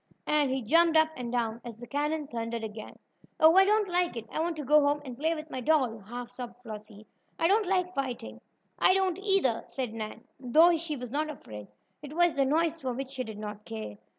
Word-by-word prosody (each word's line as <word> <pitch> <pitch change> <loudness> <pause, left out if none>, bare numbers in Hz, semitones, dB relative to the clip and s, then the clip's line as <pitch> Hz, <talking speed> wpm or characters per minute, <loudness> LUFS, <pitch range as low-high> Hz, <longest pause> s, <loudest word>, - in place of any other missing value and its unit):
and 300 -2 +2
he 260 -1 -1
jumped 330 +7 +4
up 315 0 +5
and 240 -2 -5
down 235 -1 -1
as 235 -3 -8
the 240 - -9
cannon 295 +3 -1
thundered 230 -3 -4
again. 215 0 -7 0.4
"Oh, 320 +2 +7
I 385 0 +7
don't 420 0 +3
like 350 -6 0
it! 225 - -5
I - - -3
want 330 0 -1
to 295 - -5
go 300 +3 +6
home 290 +1 +2
and 255 -2 -7
play 320 +5 0
with 310 0 -8
my 255 - -4
doll!" 260 -6 +2
half 240 +4 -8
sobbed 245 -2 -7
Flossie. 215 -1 -10 0.3
"I 330 - +2
don't 410 +2 +3
like 365 -1 +1
fighting." 240 - -4
"And - - -41 0.5
I - - +6
don't, 380 -2 +1
either," 390 - +2
said 250 -5 -4
Nan, 215 -1 -6 0.2
though 315 +7 +5
she 320 -1 -3
was 250 -3 -7
not 305 +3 -1
afraid. 105 - -9 0.3
It 290 0 -9
was 345 -1 +4
the 275 -1 +2
noise 320 +3 +2
for 260 -5 -3
which 265 +2 -5
she 260 -2 -3
did 220 -3 -8
not 210 0 -7
care. 105 - -7
270 Hz, 230 wpm, -29 LUFS, 230-320 Hz, 0.5 s, Oh